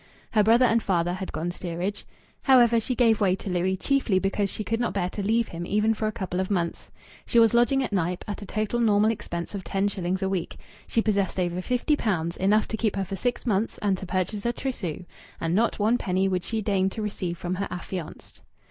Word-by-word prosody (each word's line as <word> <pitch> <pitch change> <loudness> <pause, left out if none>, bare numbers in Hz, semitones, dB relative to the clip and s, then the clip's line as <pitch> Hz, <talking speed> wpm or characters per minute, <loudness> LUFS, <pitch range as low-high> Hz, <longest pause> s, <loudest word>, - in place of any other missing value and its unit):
Her 215 - +4
brother 230 +4 +5
and 230 -1 +3
father 175 -3 +1
had 185 +1 -5
gone 170 +2 -2
steerage. 180 +3 -4 0.3
However, 240 -4 +5
she 250 +3 -2
gave 225 -3 +3
way 190 -2 +3
to 195 0 -6
Louis, 180 +2 0
chiefly 265 -3 +1
because 195 +1 0
she 215 - -4
could 225 +3 -1
not 240 - -1
bear 180 -2 0
to 205 - -4
leave 225 +3 +1
him 170 0 -5
even 210 +2 +2
for 215 0 -2
a - - 0
couple 185 -3 -3
of 190 - -1
months. 175 -4 -2 0.4
She 235 - +1
was 225 -1 +6
lodging 255 +3 +3
at 240 - -4
Knype, 180 -1 -1
at 205 - -5
a 200 - -8
total 215 +3 -1
normal 215 -1 +4
expense 170 -5 -5
of 200 -2 -5
ten 195 +2 0
shillings 190 -1 -2
a - - +1
week. 190 -3 -3 0.3
She 225 - +1
possessed 200 -3 0
over 175 0 -1
fifty 250 +8 +1
pounds 175 - -1
enough 205 +3 +3
to 220 - -2
keep 215 -2 0
her 195 -1 -1
for 195 +2 -5
six 245 +7 -2
months 215 -1 0
and 200 -2 +2
to 190 - -7
purchase 185 +3 -2
a 235 - +1
trousseau, 190 - -4 0.3
and 165 0 -1
not 225 +5 +2
one 220 +4 +2
penny 190 +1 +1
would 185 -2 -1
she 225 -2 -2
deign 195 -2 +2
to 220 - -6
receive 185 -4 -3
from 175 +1 -3
her 195 +2 -2
affianced. 180 -1 -7
200 Hz, 230 wpm, -26 LUFS, 185-225 Hz, 0.4 s, was